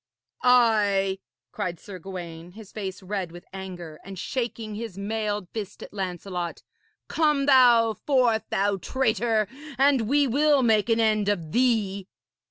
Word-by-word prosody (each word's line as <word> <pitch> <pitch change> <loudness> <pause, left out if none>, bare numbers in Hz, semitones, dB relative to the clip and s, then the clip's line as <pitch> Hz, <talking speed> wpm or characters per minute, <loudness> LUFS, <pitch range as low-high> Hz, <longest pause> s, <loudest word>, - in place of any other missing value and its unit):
'Ay,' 210 -6 +3 0.3
cried 180 -5 -4
Sir 190 -3 -9
Gawaine, 175 -2 -8
his 215 -1 -12
face 195 -2 -6
red 190 -3 -3
with 175 +1 -12
anger, 180 -5 -8
and 195 0 -9
shaking 230 0 -4
his 215 -3 -6
mailed 210 -1 -2
fist 205 -3 -6
at - - -11
Lancelot, 180 -2 -4 0.4
'come 300 -3 +2
thou 240 -5 +6
forth, 245 -3 +1
thou 200 0 +1
traitor, 225 -1 0 0.3
and 265 -4 +3
we 285 +1 +4
will 285 +2 +3
make 220 -1 +3
an 225 0 +3
end 215 -2 +2
of 170 -7 -2
thee.' 215 -5 +1
210 Hz, 140 wpm, -25 LUFS, 190-235 Hz, 0.4 s, thou